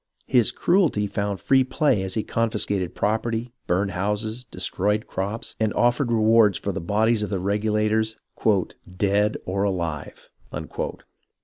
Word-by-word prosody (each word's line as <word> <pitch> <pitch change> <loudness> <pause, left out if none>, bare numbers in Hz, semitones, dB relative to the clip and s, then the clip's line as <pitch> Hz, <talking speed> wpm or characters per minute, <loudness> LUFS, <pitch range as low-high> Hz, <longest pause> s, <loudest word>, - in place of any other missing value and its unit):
His 120 -4 +3
cruelty 170 - +2
found 100 -1 -2
free 130 +7 +4
play 130 -3 +1
as 95 -1 -3
he 110 - 0
con 115 0 0
fiscated 100 -4 -2
property, 115 +3 -1
burned 95 +3 +1
houses, 105 +5 -2
destroyed 105 0 -1
crops, 100 +4 -4
and 110 -1 +1
offered 120 +1 +2
rewards 110 -2 +4
for 100 - -3
the 95 - -4
bodies 110 +5 +2
of 105 - -2
the 100 - -1
Regulators 105 +3 0 0.8
"dead 105 +2 +2
or 95 +1 -1
alive." 85 -7 -3
105 Hz, 135 wpm, -24 LUFS, 100-115 Hz, 0.8 s, free